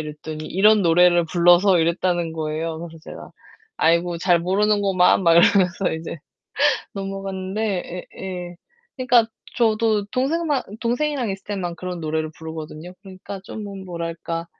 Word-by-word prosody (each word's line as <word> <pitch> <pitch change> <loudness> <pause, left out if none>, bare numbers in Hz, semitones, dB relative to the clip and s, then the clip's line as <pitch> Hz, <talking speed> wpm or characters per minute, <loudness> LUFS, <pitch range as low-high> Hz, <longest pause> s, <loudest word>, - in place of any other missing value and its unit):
이랬더니 155 +1 -7
"이런 210 +2 +4
노래를 175 0 +4
불러서" 175 +2 +4
이랬다는 170 0 0
거예요. 160 +1 -3
그래서 165 -1 -9
제가 - - -10 0.5
"아이고 170 +1 +2
잘 175 -1 +3
모르는구만." 195 0 +2
막 170 -2 +5
이러면서 180 +1 +4
이제 160 0 -6 0.8
넘어갔는데 195 -1 -4
예예. 180 -2 -6 0.4
그니까 250 -3 +4 0.3
저도 220 -3 +2
동생만 285 +4 0 0.2
동생이랑 250 +1 -1
있을 195 0 -6
때만 180 -4 -4
그런 180 -1 -6
노래를 155 0 -2
부르거든요. 160 +2 -8
그러니까 195 +1 -9
좀 210 0 -7
음 195 -1 -8
뭐랄까 170 -1 -5
180 Hz, 335 characters per minute, -22 LUFS, 170-205 Hz, 0.8 s, 막